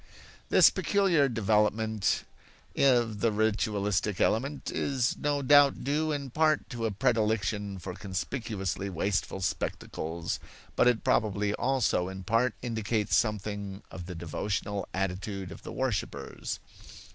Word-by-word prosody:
This - - +7
peculiar 180 -9 +2
development 110 -2 +1 0.5
of 120 -6 +3
the 115 +2 +2
ritualistic 105 -2 0
element 140 +6 0
is 130 -3 0
no 145 -1 -1
doubt 145 0 +5
due 155 +3 0
in 140 -3 -3
part 155 +2 +2
to 115 -2 -2
a - - -2
predilection 105 -3 0
for 90 +1 -6
conspicuously 100 0 -3
wasteful 95 +1 -1
spectacles, 85 -3 -3 0.4
but - - +4
it 120 -2 +2
probably 105 -1 +1
also 125 -9 +1
in 95 0 -7
part 115 +4 +1
indicates 110 -3 0
something 100 -2 -1
of 90 -1 -8
the 90 - -6
devotional 100 +4 -3
attitude 95 0 -3
of - - -10
the - - -8
worshippers. 130 -7 -3
105 Hz, 120 wpm, -29 LUFS, 95-125 Hz, 0.5 s, This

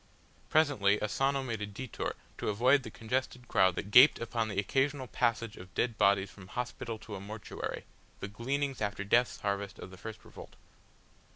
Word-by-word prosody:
Presently 130 -10 +3
Asano 135 +6 0
made 115 -5 -4
a 105 - -2
detour 110 +4 -5 0.2
to - - -1
avoid 125 +7 +4
the - - -8
congested 125 +1 -3
crowd 95 -5 +3
that 100 - -5
gaped 130 +6 +9
upon 115 -1 -2
the 100 -3 -5
occasional 135 +6 0
passage 115 -3 -1
of 90 0 -12
dead 120 -2 +1
bodies 100 0 +3
from 100 -2 -13
hospital 120 0 -4
to 110 0 -10
a 100 - -4
mortuary, 105 +2 -6 0.4
the - - -4
gleanings 135 +6 -2
after 100 -1 -2
death's 120 +5 +2
harvest 100 -1 -2
of - - -9
the 95 - -11
first 110 +3 -9
revolt. - - -12
115 Hz, 175 wpm, -31 LUFS, 100-125 Hz, 0.4 s, gaped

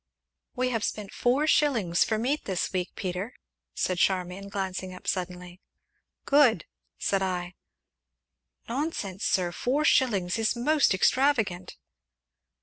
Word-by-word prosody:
"We 255 0 0
have 225 -4 -1
spent 205 -2 -4
four 255 +5 +2
shillings 230 - +3
for 220 - -1
meat 270 +7 -1
this 185 -2 -2
week, 180 -1 -1
Peter!" 185 +5 -4 0.4
said 185 -1 -1
Charmian, 185 +2 0
glancing 190 -1 -4
up - - -13
suddenly. 180 0 -4 0.6
"Good!" 270 - +4 0.3
said 195 -1 0
I. 180 -1 -2 1.1
"Nonsense, 235 - -3
sir 180 -2 +1
four 270 - 0
shillings 210 -9 +2
is 225 +2 +1
most 280 -2 +3
extravagant!" 215 -6 +1
195 Hz, 120 wpm, -27 LUFS, 180-250 Hz, 1.1 s, Good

